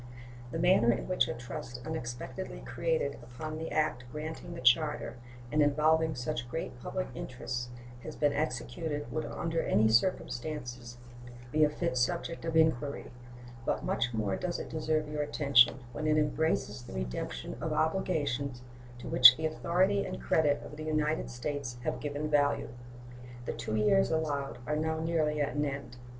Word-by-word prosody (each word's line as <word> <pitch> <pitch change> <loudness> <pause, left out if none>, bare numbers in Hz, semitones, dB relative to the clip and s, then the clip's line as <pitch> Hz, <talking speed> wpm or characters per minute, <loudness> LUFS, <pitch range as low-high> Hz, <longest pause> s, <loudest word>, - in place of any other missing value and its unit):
The 165 - -4
manner 165 -9 +5
in 115 - -2
which 185 -9 +2
a 120 - -3
trust 120 0 -7
unexpectedly 120 - -5
created 160 - -1
upon 155 +6 -6
the 160 - -4
act 155 -5 +1
granting 160 +3 -6
the - - -6
charter, 140 +1 +3 0.3
and 150 - +3
involving 155 +2 +3
such 125 -1 -3
great - - -5
public - - -3
interests, 120 -1 -5 0.3
has - - -7
been 145 -1 +2
executed 145 +2 -3
would 155 - -2
under 165 -1 -1
any 110 +1 +3
circumstances 120 -3 -1 0.5
be 155 +2 +4
a 150 - +5
fit 150 -2 -2
subject 170 +5 -1
of 165 -1 0
inquiry; 145 -3 +1 0.5
but - - -1
much 120 +1 0
more 105 -4 -1
does 175 - -2
it - - -6
deserve 155 -1 0
your 150 0 -2
attention 140 -4 +5 0.2
when 155 +6 -2
it 155 0 +3
embraces 150 -7 0
the 120 - -10
redemption 60 -1 -4
of - - -2
obligations 145 -7 0 0.3
to 120 - -8
which 125 0 +9
the 160 - -2
authority 185 +5 +2
and - - -5
credit 145 -3 +2
of 150 - -9
the 155 - -6
United 155 0 0
States 125 +1 -4
have - - -2
given 145 +1 -3
value. 145 -1 +2 0.8
The - - -2
two 110 - -3
years 195 - +4
allowed 145 -3 -1
are 150 - 0
now 160 +1 0
nearly 160 -2 +1
at 145 - 0
an 145 - +1
end. 140 -3 -4
150 Hz, 165 wpm, -31 LUFS, 125-160 Hz, 0.8 s, which